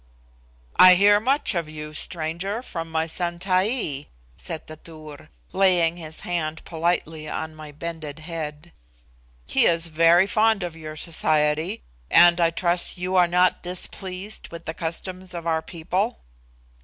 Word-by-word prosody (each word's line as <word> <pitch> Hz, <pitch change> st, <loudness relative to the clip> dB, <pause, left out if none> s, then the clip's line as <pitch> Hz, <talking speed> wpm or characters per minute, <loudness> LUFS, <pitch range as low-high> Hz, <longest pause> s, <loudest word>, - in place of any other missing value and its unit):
"I 185 Hz, 0 st, +9 dB
hear 205 Hz, +2 st, +5 dB
much 265 Hz, +3 st, +1 dB
of 170 Hz, -4 st, -2 dB
you, 150 Hz, 0 st, -8 dB
stranger, 175 Hz, +8 st, -3 dB
from 165 Hz, -8 st, -6 dB
my 160 Hz, 0 st, 0 dB
son 170 Hz, +1 st, -3 dB
Taee," 185 Hz, -, 0 dB, 0.3 s
said 160 Hz, -, -6 dB
the 155 Hz, -, -10 dB
Tur, 155 Hz, -2 st, -12 dB, 0.2 s
laying 175 Hz, -3 st, +3 dB
his 160 Hz, -2 st, -8 dB
hand 160 Hz, -3 st, -3 dB
politely 160 Hz, -2 st, -2 dB
on 160 Hz, 0 st, -4 dB
my 155 Hz, -1 st, -10 dB
bended 155 Hz, -1 st, -7 dB
head. 155 Hz, 0 st, -7 dB, 0.8 s
"He -, -, +3 dB
is 165 Hz, 0 st, +3 dB
very 165 Hz, +3 st, +5 dB
fond 215 Hz, -1 st, +2 dB
of 175 Hz, -2 st, -5 dB
your 155 Hz, -1 st, -8 dB
society, 155 Hz, -, 0 dB, 0.3 s
and 175 Hz, 0 st, +6 dB
I 165 Hz, -, +4 dB
trust 175 Hz, +2 st, 0 dB
you 180 Hz, +1 st, -2 dB
are 180 Hz, -1 st, +5 dB
not 180 Hz, +1 st, +2 dB
displeased 185 Hz, +3 st, -3 dB
with 170 Hz, -, -10 dB
the 160 Hz, -, -4 dB
customs 180 Hz, +3 st, -5 dB
of 170 Hz, -1 st, -6 dB
our 160 Hz, -1 st, +1 dB
people." 180 Hz, +7 st, -2 dB
170 Hz, 145 wpm, -24 LUFS, 155-185 Hz, 0.8 s, I